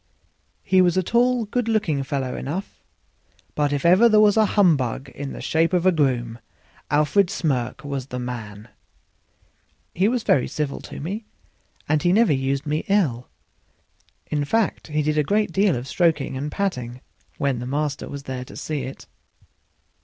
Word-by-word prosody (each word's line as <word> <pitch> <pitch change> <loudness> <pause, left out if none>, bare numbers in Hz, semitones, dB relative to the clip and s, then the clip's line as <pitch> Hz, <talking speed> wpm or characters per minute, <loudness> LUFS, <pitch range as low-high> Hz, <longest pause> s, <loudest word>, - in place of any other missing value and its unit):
He 190 -1 +4
was 180 0 +3
a 185 - +2
tall, 240 +3 +2
good 235 +2 -2
looking 205 -11 +1
fellow 135 -1 -3
enough; 180 +9 -5 0.7
but 145 -1 0
if 145 +1 -2
ever 185 +7 +6
there 215 -1 +5
was 210 -1 +5
a 220 -1 +4
humbug 140 - +2
in 140 -1 -7
the - - -7
shape 165 +2 +1
of 180 0 +2
a 185 - +6
groom 125 -7 0 0.5
Alfred 150 +6 +3
Smirk 140 - -2
was 140 -2 -4
the 125 - -5
man. 115 -4 -6 1.2
He 185 +4 +2
was 240 0 0
very 130 - +2
civil 150 -2 -3
to - - -9
me, 200 +9 -5 0.6
and 150 0 +1
never 190 0 +4
used 135 +1 -1
me 150 +1 -1
ill; 150 - +1 1.0
in 150 -1 -1
fact, 220 +9 0
he 150 -1 -1
did 155 +1 +1
a - - +3
great 210 +5 +1
deal 195 0 +2
of 120 +2 -5
stroking 160 -5 +1
and 145 +3 -4
patting 125 -11 -3 0.4
when 140 -3 0
his 125 +1 -5
master 145 +1 -2
was 140 -1 -7
there 130 -2 -5
to - - -12
see 150 -3 -3
it. 130 +1 -8
150 Hz, 170 wpm, -23 LUFS, 135-195 Hz, 1.2 s, ever